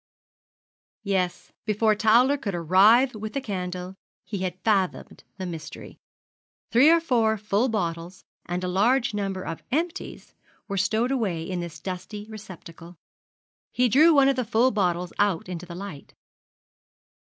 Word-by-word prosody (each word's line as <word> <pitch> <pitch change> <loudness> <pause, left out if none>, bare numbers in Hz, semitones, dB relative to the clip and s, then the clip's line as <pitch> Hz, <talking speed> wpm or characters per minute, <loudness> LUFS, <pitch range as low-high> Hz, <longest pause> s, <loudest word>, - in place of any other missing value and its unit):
Yes, 190 -3 -2
before 215 0 +2
Towler 230 +6 +4
could 205 -9 -4
arrive 205 - +5
with 215 0 -6
the 275 - -1
candle, 185 -5 -5 0.3
he 195 +1 -5
had 185 -1 -4
fathomed 195 -4 -1
the 190 - -5
mystery. 165 -3 -8 0.7
Three 255 +6 +6
or 335 +1 +6
four 230 -8 +1
full 210 +4 0
bottles, 175 -4 -4 0.2
and 180 +1 -3
a - - -1
large 230 +7 +2
number 195 -2 -3
of 165 -2 -6
empties, 330 +5 -3 0.3
were 200 - -4
stowed 220 +6 +1
away 200 -11 -1
in 180 +1 -4
this 170 -2 -7
dusty 195 +3 -6
receptacle. 175 -4 -11 0.8
He 250 0 +2
drew 300 +9 +6
one 280 -3 +5
of 275 -1 +2
the 255 - +1
full 235 +3 +2
bottles 180 -4 -1
out 200 -5 +1
into 180 -1 -6
the 170 - -8
light. 180 -6 -9
200 Hz, 145 wpm, -25 LUFS, 180-230 Hz, 0.8 s, Three